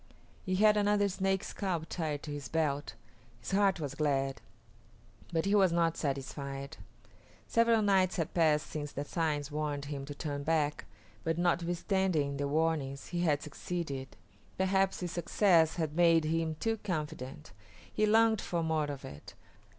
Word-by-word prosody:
He 185 Hz, -, +1 dB
had 210 Hz, +2 st, +5 dB
another 205 Hz, 0 st, +3 dB
Snake 195 Hz, 0 st, 0 dB
scalp 180 Hz, -5 st, -3 dB
tied 155 Hz, -4 st, -3 dB
to 150 Hz, -, -6 dB
his 145 Hz, -1 st, -5 dB
belt. 150 Hz, -3 st, -1 dB, 0.4 s
His -, -, -7 dB
heart 195 Hz, -2 st, +3 dB
was 145 Hz, -3 st, -4 dB
glad, 135 Hz, -2 st, 0 dB, 0.9 s
but 165 Hz, 0 st, 0 dB
he 200 Hz, -, +1 dB
was 195 Hz, -4 st, +5 dB
not 165 Hz, -1 st, +2 dB
satisfied. 140 Hz, -1 st, -4 dB, 0.7 s
Several 230 Hz, -1 st, +3 dB
nights 190 Hz, -2 st, +3 dB
had 165 Hz, -4 st, -2 dB
passed 155 Hz, -3 st, +3 dB
since 150 Hz, -2 st, -5 dB
the 145 Hz, -, -4 dB
signs 150 Hz, -3 st, -1 dB
warned 145 Hz, -1 st, -2 dB
him 140 Hz, -1 st, -5 dB
to 145 Hz, 0 st, -7 dB
turn 145 Hz, -2 st, -4 dB
back, 150 Hz, -1 st, 0 dB, 0.4 s
but 165 Hz, 0 st, 0 dB
notwithstanding 175 Hz, -3 st, +1 dB
the 140 Hz, 0 st, -1 dB
warnings, 145 Hz, -3 st, -1 dB
he 175 Hz, -, -2 dB
had 150 Hz, -4 st, +1 dB
succeeded. 145 Hz, -4 st, -5 dB, 0.4 s
Perhaps 190 Hz, 0 st, +1 dB
his 175 Hz, -2 st, -3 dB
success 170 Hz, -2 st, +3 dB
had 160 Hz, -4 st, -2 dB
made 165 Hz, -2 st, +5 dB
him 160 Hz, 0 st, 0 dB
too 225 Hz, +7 st, -1 dB
confident. 150 Hz, -, -5 dB, 0.4 s
He 215 Hz, -, +2 dB
longed 220 Hz, 0 st, +4 dB
for 170 Hz, -2 st, -2 dB
more 160 Hz, -2 st, +1 dB
of 140 Hz, -2 st, -6 dB
it. 70 Hz, +1 st, -11 dB
160 Hz, 155 wpm, -32 LUFS, 145-185 Hz, 0.9 s, had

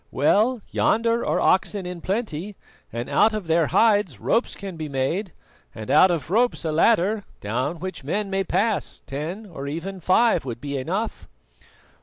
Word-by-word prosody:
"Well, 215 Hz, -, +2 dB
yonder 230 Hz, +1 st, +2 dB
are -, -, 0 dB
oxen 190 Hz, +1 st, +2 dB
in 180 Hz, -1 st, -6 dB
plenty, 200 Hz, -2 st, -3 dB, 0.4 s
and 120 Hz, +1 st, -4 dB
out 220 Hz, 0 st, +3 dB
of 210 Hz, -4 st, -4 dB
their 165 Hz, -1 st, +2 dB
hides 205 Hz, -, +3 dB
ropes 235 Hz, -, 0 dB
can 195 Hz, -3 st, -7 dB
be 155 Hz, -2 st, -5 dB
made, 160 Hz, +9 st, -1 dB, 0.4 s
and 110 Hz, -1 st, -5 dB
out 190 Hz, -, +7 dB
of 165 Hz, -3 st, -2 dB
ropes 235 Hz, -3 st, +1 dB
a 160 Hz, -, 0 dB
ladder, 205 Hz, +5 st, +3 dB, 0.2 s
down 125 Hz, +10 st, -2 dB
which 185 Hz, -3 st, -6 dB
men 200 Hz, +8 st, -2 dB
may 195 Hz, 0 st, +1 dB
pass; 200 Hz, +4 st, -1 dB
ten, 160 Hz, +10 st, -5 dB
or 150 Hz, -8 st, -7 dB
even 175 Hz, +6 st, -5 dB
five, 185 Hz, +2 st, +3 dB
would 120 Hz, -3 st, -5 dB
be 140 Hz, +1 st, -5 dB
enough." 165 Hz, -, -3 dB
185 Hz, 165 wpm, -24 LUFS, 150-210 Hz, 0.4 s, out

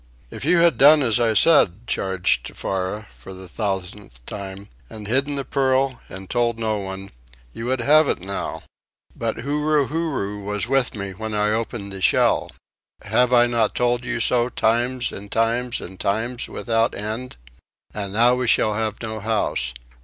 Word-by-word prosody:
"If -, -, -7 dB
you 170 Hz, +5 st, +3 dB
had 170 Hz, 0 st, +4 dB
done 150 Hz, +1 st, +7 dB
as 115 Hz, -2 st, +2 dB
I 115 Hz, -2 st, +2 dB
said," 110 Hz, -, +4 dB
charged 95 Hz, -4 st, 0 dB
Tefara, 95 Hz, +3 st, -4 dB
for 95 Hz, -, -12 dB
the 95 Hz, 0 st, -10 dB
thousandth 95 Hz, -, -5 dB
time, 100 Hz, 0 st, -7 dB, 0.2 s
"and 110 Hz, -1 st, -9 dB
hidden 135 Hz, +6 st, 0 dB
the 140 Hz, -1 st, -3 dB
pearl 130 Hz, -1 st, +1 dB
and 95 Hz, 0 st, -8 dB
told 120 Hz, 0 st, 0 dB
no 110 Hz, -2 st, -1 dB
one, 95 Hz, 0 st, -7 dB, 0.4 s
you 115 Hz, -, -6 dB
would 130 Hz, 0 st, 0 dB
have 150 Hz, +4 st, +5 dB
it -, -, 0 dB
now." 100 Hz, +2 st, -5 dB, 0.5 s
"But -, -, -3 dB
Huru 150 Hz, +1 st, +1 dB
Huru 140 Hz, -11 st, -2 dB
was 105 Hz, +2 st, -2 dB
with 135 Hz, -2 st, +1 dB
me 100 Hz, -2 st, -5 dB
when 110 Hz, +3 st, -5 dB
I 105 Hz, 0 st, +1 dB
opened 110 Hz, -2 st, -3 dB
the 95 Hz, -1 st, -7 dB
shell -, -, +3 dB, 0.5 s
have 125 Hz, 0 st, +2 dB
I 120 Hz, -1 st, +6 dB
not 115 Hz, -3 st, 0 dB
told 120 Hz, 0 st, +1 dB
you 125 Hz, -1 st, -3 dB
so 120 Hz, +2 st, +1 dB
times 120 Hz, +2 st, 0 dB
and 100 Hz, +1 st, -9 dB
times 120 Hz, +2 st, 0 dB
and 95 Hz, +1 st, -10 dB
times 115 Hz, +5 st, -1 dB
without 115 Hz, -1 st, 0 dB
end?" 110 Hz, -, -4 dB, 0.6 s
"And 100 Hz, -2 st, -4 dB
now 120 Hz, +3 st, +5 dB
we 125 Hz, -1 st, -1 dB
shall 110 Hz, -1 st, +3 dB
have 110 Hz, 0 st, -2 dB
no 110 Hz, -1 st, -4 dB
house. 110 Hz, -, 0 dB
115 Hz, 170 wpm, -22 LUFS, 100-125 Hz, 0.6 s, done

